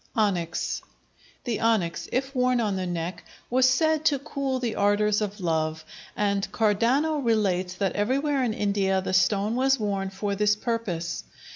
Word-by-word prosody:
Onyx 180 -7 0 0.6
The 235 -4 -2
onyx, 215 -7 0
if 265 +2 -1
worn 250 -1 +2
on 210 -4 0
the 185 -1 -2
neck, 175 +1 -4 0.3
was 255 +1 +5
said 315 +3 +2
to 290 -3 +4
cool 275 -1 -3
the 240 -3 -2
ardors 205 +1 +2
of 210 0 -3
love, 160 -2 -1 0.3
and 200 -1 0
Cardano 250 +8 +2
relates 190 -6 +1
that 195 0 -1
everywhere 270 +6 +1
in 225 -3 -1
India 200 -2 +1
the 190 - -3
stone 200 +3 +2
was 265 +1 +2
worn 200 -2 -1
for 200 +1 -3
this 210 +1 +2
purpose. 210 -7 -3
210 Hz, 155 wpm, -26 LUFS, 190-255 Hz, 0.6 s, was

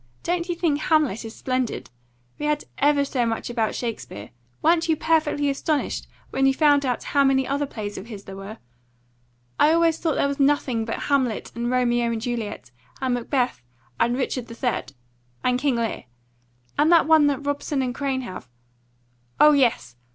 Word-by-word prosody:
Don't 350 0 -1
you 350 - 0
think 325 -4 +1
'Hamlet' 310 - +1
is 225 0 -8
splendid? 255 -2 -2 0.5
We 300 - -1
had 300 0 0 0.2
ever 285 0 +3
so 260 -3 0
much 230 +1 -2
about 225 -3 -1
Shakespeare. 220 - -5 0.3
Weren't 330 +1 +3
you 320 - +4
perfectly 305 -2 +1
astonished 285 +2 -1 0.2
when 270 0 +2
you 270 - +3
found 290 -2 +4
out 250 - -1
how 280 -1 +2
many 265 -1 +3
other 285 +1 -1
plays 205 -5 -6
of 195 - -10
his 210 -4 -8
there 195 - -9
were? 195 +3 -8 1.0
I 300 - +6
always 330 0 +3
thought 320 -3 0
there - - +2
was 280 0 -3
nothing 275 -5 +2
but 230 - -4
'Hamlet' 265 -6 0
and 235 +1 -2
'Romeo 240 -1 +2
and 230 - -2
Juliet' 225 - -4 0.3
and 260 -2 0
'Macbeth' 245 - -1 0.4
and 240 +1 +2
'Richard 255 -2 -2
III.' 235 +1 -2 0.6
and 250 0 +2
'King 275 -2 +1
Lear,' 230 - -2 0.7
and 310 +3 +4
that 335 -3 +6
one 315 -2 +5
that 285 0 -1
Robeson 285 -1 -1
and 250 -1 -2
Crane 270 0 -2
have 185 - -8 0.9
oh 300 - +8
yes! 235 - +1
265 Hz, 175 wpm, -24 LUFS, 235-290 Hz, 1.0 s, oh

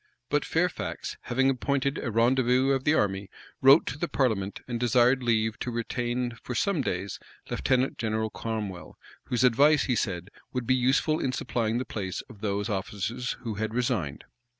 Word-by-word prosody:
But - - +2
Fairfax, - - -1
having 130 +2 +2
appointed 140 +1 0
a 130 - -3
rendezvous 125 +3 +3
of 135 -1 0
the 150 - +4
army, 100 -3 0 0.3
wrote 135 +4 +7
to 145 - -5
the 170 - 0
parliament, 110 -10 0
and 120 -2 -3
desired 125 +2 +4
leave 110 -2 +1
to - - -3
retain 120 +1 -2
for 125 - -5
some 195 - +1
days 95 -5 -3 0.3
Lieutenant 130 0 +1
General 110 -1 -1
Cromwell, 105 -5 -5 0.3
whose 125 0 0
advice, 140 +5 +5
he 125 - +1
said, 95 -3 -2 0.2
would 125 -2 -2
be 130 - +3
useful 130 +5 +2
in 130 - -1
supplying 115 -3 -1
the 130 - -2
place 95 -4 -4
of 105 -4 -15
those 100 0 -1
officers 105 +4 -3
who 115 -3 -4
had 110 +1 -2
resigned. 120 - -1
120 Hz, 170 wpm, -27 LUFS, 110-130 Hz, 0.3 s, wrote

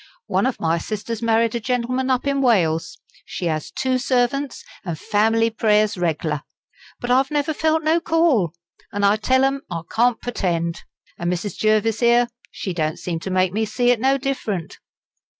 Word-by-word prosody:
One 200 +3 +1
of 260 - -3
my 165 +1 +1
sisters 215 +4 -4
married 230 0 +2
a 235 - -1
gentleman 250 +2 -1
up 255 0 +1
in 280 -1 +1
Wales. 175 -11 +2 0.3
She 175 - -4
'as 155 -2 -2
two 260 -1 -1
servants, 255 +2 0 0.2
an' 170 -3 -3
fam'ly 225 +5 +2
prayers 215 -1 +2
reg'lar. 160 -4 -1 0.6
But 245 - -3
I've 265 +2 +3
never 295 +1 0
felt 315 +1 +1
no 320 +2 +3
'call,' 325 - +2 0.4
and 200 0 0
I 200 +2 +4
tell 260 +5 +2
'em 270 0 +1
I 170 -3 -3
can't 240 0 +2
purtend. 170 -8 -2 0.4
An' 170 - -1
Mrs. 180 +2 -3
Jervis 215 0 +2
here, 240 0 +4 0.2
she 190 - -5
don't 155 -2 -1
seem 170 -2 -4
to 190 - -6
make 185 -1 +1
me 220 +2 0
see 245 +3 +2
it 245 - +1
no 265 +3 +3
different." 245 - -3
225 Hz, 175 wpm, -21 LUFS, 185-255 Hz, 0.6 s, I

